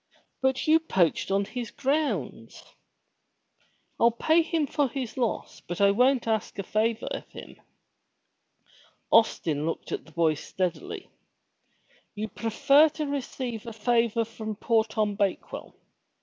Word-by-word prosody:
''But 265 0 +1
you 315 +1 +5
poached 190 - +1
on 200 +1 +1
his 240 +1 -5
grounds." 255 - -2
• - - -22 1.3
"I'll 235 - +6
pay 315 +8 +3
him 325 -2 0
for 285 0 0
his 255 -2 -5
loss, 240 -4 -2
but 175 - -4
I 200 0 +5
won't 250 +3 +3
ask 220 -1 -1
a 195 - -3
favor 220 +3 0
of - - -5
him." - - -12 1.5
Austin 160 -9 +3
looked 165 - -4
at - - -3
the - - -15
boy 160 -1 +2
steadily. 180 +3 -4 1.0
"You 215 +1 -4
prefer 280 +9 +4
to 305 - -1
receive 255 -5 -4
a 230 - -5
favor 230 0 +1
from 220 -1 -6
poor 225 +1 +2
Tom 215 -2 -1
Bakewell? 200 -1 -3
225 Hz, 135 wpm, -27 LUFS, 200-265 Hz, 1.5 s, I'll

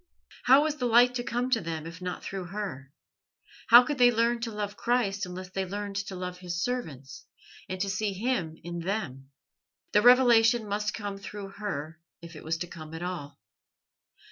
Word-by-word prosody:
How 270 +3 +7
was 305 -1 -1
the 250 - 0
light 240 +2 +5
to 245 -1 -2
come 245 +2 -2
to 230 - +3
them 160 -2 -5
if 165 +2 -9
not 180 0 -5
through 190 -2 -5
her? 175 -9 -6 0.8
How 240 +2 +10
could 280 +1 -3
they 245 0 +7
learn 235 +1 +1
to 230 0 -4
love 205 -1 -4
Christ 205 -5 0
unless 185 +1 -8
they 190 0 -2
learned 200 +1 -5
to 190 - -6
love 180 0 -5
His 175 -1 -3
servants 155 - -5 0.4
and 185 0 -4
to 200 - 0
see 195 +1 -1
Him 190 -7 -2
in 175 0 -5
them? 165 -8 -4 0.6
The 210 - +4
revelation 240 -2 +6
must 210 +1 -2
come 205 -2 -5
through 200 0 -7
her, 165 -6 -5 0.2
if 170 -1 -11
it 155 - -10
was 160 +1 -1
to 175 - -5
come 160 -2 -9
at 165 - -6
all. 150 -6 -5
195 Hz, 190 wpm, -28 LUFS, 175-235 Hz, 0.8 s, How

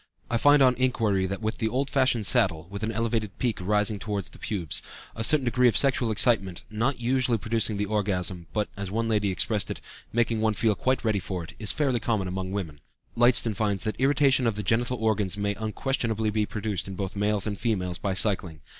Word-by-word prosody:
I 120 - +2
find 145 +3 +5
on 130 -1 +5
inquiry 110 -7 +1
that 100 +3 -5
with 110 +2 -2
the 110 - 0
old 135 +4 -1
fashioned 130 -5 +2
saddle, 85 -4 +2
with 100 +1 -6
an 110 +1 -1
elevated 115 -2 -2
peak 120 -5 -1
rising 105 +2 +1
toward 105 -2 -3
the - - -7
pubes, 90 -9 -1 0.3
a 115 - -3
certain 140 +3 +3
degree 125 +1 +3
of 120 - +3
sexual 130 -4 +3
excitement, 105 -5 +1
not 120 +5 -1
usually 125 0 +1
producing 110 0 0
the 105 - -1
orgasm 95 -4 -2
(but, 105 -1 -1
as 100 -1 -5
one 115 +3 -1
lady 105 -2 +1
expressed 100 +2 -1
it, - - -5 0.3
making 115 -1 0
one 110 -1 +1
feel 110 +1 +2
quite 130 +3 -1
ready 110 -2 +1
for 90 -2 -5
it), 80 - -10
is 105 -3 +1
fairly 135 -5 0
common 105 -5 -1
among 95 0 -4
women. 80 -8 -5 0.3
Lydston 120 -1 +4
finds 100 -2 0
that 110 - -2
irritation 135 -2 +3
of 115 - 0
the 105 - -4
genital 120 +5 0
organs 105 -4 0
may 100 0 -1
unquestionably 110 0 -2
be 105 0 0
produced 105 -4 -3
in 95 - -6
both 95 +1 -4
males 105 0 0
and 100 -2 -4
females 90 -6 -1
by 95 -2 -2
cycling. 95 -7 +1
110 Hz, 210 wpm, -26 LUFS, 100-120 Hz, 0.3 s, find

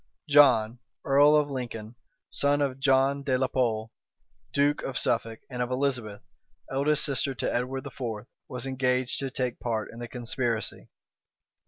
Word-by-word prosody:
John, 125 -6 +5 0.3
earl 145 +2 +6
of 150 -1 +2
Lincoln, 115 -4 -5 0.4
son 145 0 +1
of 135 -2 -1
John 135 +1 +3
de 135 -2 +1
la 130 - +1
Pole, 115 -4 -1 0.6
duke 145 +1 +2
of 135 - -4
Suffolk, 115 -1 0
and 125 -2 -5
of 125 - -1
Elizabeth, 125 -6 -2 0.5
eldest 140 +3 +2
sister 135 -1 -1
to - - -2
Edward 130 +2 -2
IV., 115 -4 -5 0.2
was 130 -3 -6
engaged 130 -1 0
to 135 - -3
take 125 -2 -3
part 110 -3 -2
in 115 - -10
the 120 - -5
conspiracy. 120 -1 -3
130 Hz, 150 wpm, -27 LUFS, 120-140 Hz, 0.6 s, earl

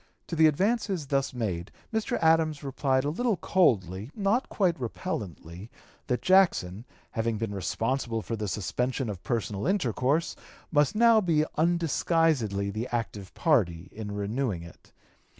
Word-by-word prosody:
To 170 - -2
the 160 0 +6
advances 195 +1 0
thus 135 0 0
made 100 -8 -3 0.2
Mr. 220 -1 0
Adams 160 -2 +3
replied 135 -1 0
a 145 - 0
little 230 +3 0
coldly, 105 - +1
not 210 +5 +1
quite 185 -5 +1
repellently, 105 - -5 0.4
that 125 - -1
Jackson, 145 - +3 0.3
having 115 -1 -1
been 110 -1 -3
responsible 115 +3 -2
for 115 - -3
the 105 -1 -3
suspension 125 - -2
of 95 -4 -8
personal 110 - -2
intercourse, 155 - +1 0.4
must 145 0 +3
now 230 0 +6
be 160 -5 +2
undisguisedly 160 - +1
the 110 +4 -3
active 110 -5 -3
party 95 - +1
in 105 -1 -6
renewing 100 -2 -2
it. 85 - -15
130 Hz, 135 wpm, -28 LUFS, 105-165 Hz, 0.4 s, the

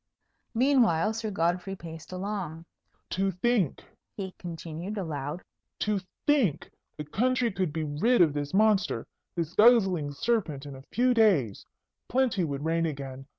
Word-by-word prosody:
Meanwhile, 230 - +3
Sir 220 0 -3
Godfrey 180 +1 -1
paced 165 -3 -10
along. 185 -4 -4 0.5
"To 195 +1 +1
think," 190 - 0 0.3
he 190 -2 -4
continued, 170 +3 -6
aloud, 150 -3 -4 0.4
"to 210 -2 +1 0.3
think 265 - +2 0.3
the 150 - -4
country 245 - +1
could 185 -4 -1
be 160 +1 -2
rid 155 +12 +2
of 165 -5 +5
this 145 -1 -3
monster, 210 0 +2 0.3
this 170 -1 -2
guzzling 190 -10 +5
serpent, 155 - -1
in 140 -1 -8
a 135 - -10
few 250 +1 +3
days! 185 - +2 0.4
Plenty 245 -7 +2
would 145 -2 -3
reign 165 +1 +1
again. 135 -2 -6
180 Hz, 140 wpm, -28 LUFS, 155-215 Hz, 0.5 s, of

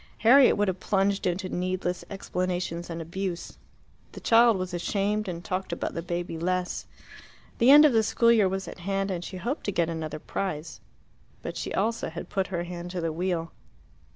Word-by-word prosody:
Harriet 260 +3 +7
would 205 0 +2
have 185 -1 -1
plunged 195 0 +1
into 185 +2 -1
needless 180 0 -2
explanations 180 -3 -3
and 165 -1 -4
abuse. 180 +1 -5 0.5
The - - -8
child 230 -2 +5
was 185 -1 -4
ashamed, 205 +4 -1
and 175 -1 -5
talked 190 -1 -3
about 170 - -3
the 170 - -3
baby 170 -1 -4
less. 180 +1 -2 0.7
The 235 - +5
end 295 +2 +10
of 290 - +5
the 225 - +5
school 230 +2 +3
year 215 -5 +4
was 190 0 -3
at - - -9
hand, 195 +2 -1
and 175 -2 -3
she 185 - -7
hoped 245 - -3
to 205 - 0
get 170 -3 +1
another 160 -2 -4
prize. 155 -1 -4 0.6
But - - -5
she - - -4
also 225 +4 0
had 165 +1 -7
put 195 -1 -1
her 175 -2 -2
hand 175 0 -6
to 180 -1 -4
the 165 -1 -1
wheel. 170 -1 -2
185 Hz, 190 wpm, -27 LUFS, 175-200 Hz, 0.7 s, end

